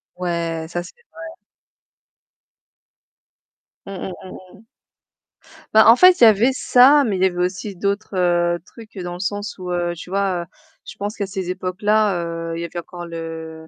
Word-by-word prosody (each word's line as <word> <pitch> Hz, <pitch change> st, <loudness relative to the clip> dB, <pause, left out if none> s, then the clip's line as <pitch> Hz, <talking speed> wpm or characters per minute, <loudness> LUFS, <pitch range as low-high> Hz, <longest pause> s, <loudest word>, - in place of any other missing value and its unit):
Ouais, 170 Hz, -2 st, -3 dB
ça 175 Hz, 0 st, -4 dB
c'est -, -, -13 dB, 0.2 s
vrai. 330 Hz, -, -9 dB, 2.6 s
Mmh, 195 Hz, -, -8 dB
mmh, 190 Hz, -, -6 dB, 0.2 s
mmh, 185 Hz, -1 st, -13 dB
mmh. 225 Hz, -, -22 dB, 1.1 s
Bah, 220 Hz, 0 st, +7 dB
en 230 Hz, -, +9 dB
fait, 365 Hz, -6 st, +6 dB
il -, -, +8 dB
y -, -, +10 dB
avait 220 Hz, +5 st, +4 dB
ça, 270 Hz, +3 st, +5 dB
mais 205 Hz, -6 st, -1 dB
il 185 Hz, -, 0 dB
y -, -, +6 dB
avait 180 Hz, -1 st, 0 dB
aussi 195 Hz, +2 st, -4 dB
d'autres, 200 Hz, +2 st, -3 dB
heu, 175 Hz, -1 st, +2 dB
trucs 220 Hz, -4 st, -15 dB
dans 175 Hz, -1 st, -5 dB
le -, -, -10 dB
sens 205 Hz, +2 st, -4 dB
où, 180 Hz, -1 st, -7 dB
heu, 175 Hz, -1 st, -1 dB
tu 175 Hz, -, -11 dB
vois, 190 Hz, -3 st, -1 dB, 0.4 s
je -, -, -10 dB
pense 205 Hz, +2 st, -5 dB
qu'à 200 Hz, -2 st, -3 dB
ces 185 Hz, -1 st, -5 dB
époques-là, 190 Hz, +1 st, 0 dB, 0.3 s
heu, 165 Hz, -, -4 dB
il -, -, -5 dB
y -, -, -3 dB
avait 175 Hz, +1 st, -6 dB
encore 175 Hz, +1 st, -9 dB
le, 160 Hz, -1 st, -8 dB
185 Hz, 180 wpm, -20 LUFS, 175-210 Hz, 2.6 s, y